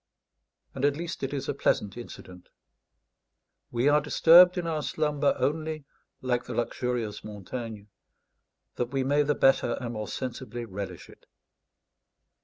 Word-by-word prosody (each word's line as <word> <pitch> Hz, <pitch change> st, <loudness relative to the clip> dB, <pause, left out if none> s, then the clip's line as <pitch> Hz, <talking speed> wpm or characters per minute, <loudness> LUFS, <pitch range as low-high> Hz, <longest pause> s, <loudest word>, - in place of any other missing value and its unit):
And 135 Hz, -, -5 dB
at 145 Hz, 0 st, +3 dB
least 170 Hz, 0 st, -5 dB
it 135 Hz, -, -2 dB
is 140 Hz, -2 st, -3 dB
a -, -, 0 dB
pleasant 100 Hz, -1 st, 0 dB
incident. 90 Hz, -6 st, -11 dB, 1.2 s
We 120 Hz, +3 st, 0 dB
are 150 Hz, +1 st, +5 dB
disturbed 175 Hz, +5 st, +7 dB
in 175 Hz, -, -1 dB
our 160 Hz, -2 st, -1 dB
slumber, 150 Hz, -1 st, 0 dB
only, 155 Hz, 0 st, -2 dB, 0.4 s
like 125 Hz, -1 st, 0 dB
the -, -, -6 dB
luxurious 120 Hz, -3 st, -2 dB
Montaigne, 110 Hz, +1 st, -7 dB, 0.9 s
"that 120 Hz, -, 0 dB
we 135 Hz, +1 st, -1 dB
may 145 Hz, +2 st, +3 dB
the 145 Hz, 0 st, +1 dB
better 135 Hz, -3 st, +3 dB
and 120 Hz, -2 st, -5 dB
more 110 Hz, -1 st, -4 dB
sensibly 120 Hz, -2 st, -5 dB
relish 95 Hz, -4 st, -7 dB
it." -, -, -18 dB
130 Hz, 140 wpm, -28 LUFS, 115-150 Hz, 1.2 s, disturbed